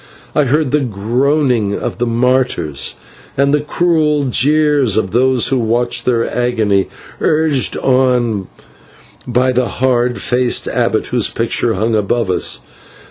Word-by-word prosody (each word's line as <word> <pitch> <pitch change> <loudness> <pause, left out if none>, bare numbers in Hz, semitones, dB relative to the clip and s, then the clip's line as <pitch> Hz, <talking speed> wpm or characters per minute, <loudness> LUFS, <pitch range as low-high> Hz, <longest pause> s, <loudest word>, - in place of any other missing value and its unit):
I 150 - +2
heard 145 +1 0
the 150 - +2
groaning 120 0 0
of - - -5
the 120 - 0
martyrs, 120 - -1 0.4
and 140 +1 +2
the 150 - +2
cruel 150 -2 +1
jeers 140 -2 +2
of 95 -4 -1
those 125 0 +2
who 130 -1 +1
watched 120 +1 0
their 120 -2 +1
agony, 110 -5 +1 0.3
urged 155 -4 +1
on 125 -6 +1 0.8
by 125 +1 +1
the 125 -1 0
hard 125 -1 0
faced 125 -1 0
abbot, - - 0
whose - - 0
picture - - -1
hung 110 +4 -1
above 105 0 0
us. - - -1
125 Hz, 135 wpm, -15 LUFS, 115-140 Hz, 0.8 s, I